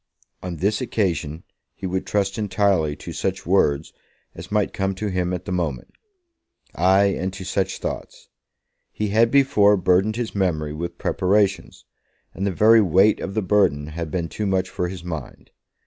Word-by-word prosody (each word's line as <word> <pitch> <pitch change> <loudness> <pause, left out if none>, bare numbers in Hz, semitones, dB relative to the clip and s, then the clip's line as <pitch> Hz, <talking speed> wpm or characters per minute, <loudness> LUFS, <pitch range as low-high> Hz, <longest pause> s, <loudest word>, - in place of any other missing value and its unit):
On 90 -1 -5
this 100 - 0
occasion 85 -10 -2 0.3
he 95 - -8
would 95 0 -2
trust 100 0 0
entirely 95 -7 +1
to - - -9
such - - -3
words 70 +2 +1 0.4
as 85 +3 -10
might 105 -1 +1
come 95 0 -1
to 105 +2 -3
him 90 -1 -1
at 90 0 -4
the - - -5
moment; 80 -8 -3 0.8
ay, 95 +3 +4
and 95 -1 -1
to 95 0 -7
such 95 0 -1
thoughts. - - -6 0.6
He 105 -1 -3
had 115 +3 +4
before 120 -7 +4
burdened 95 +4 +2
his 120 -1 -3
memory 80 -6 -1
with 85 +3 -5
preparations, 95 +1 0 0.5
and 100 +1 -2
the - - 0
very 110 +5 +5
weight 95 +3 +4
of 95 - -5
the 110 - 0
burden 90 -7 +2
had 80 +1 -5
been 85 0 -2
too 105 +4 -4
much 95 -1 0
for 90 - -2
his 90 -1 -7
mind. 80 -6 -7
95 Hz, 170 wpm, -22 LUFS, 85-105 Hz, 0.8 s, very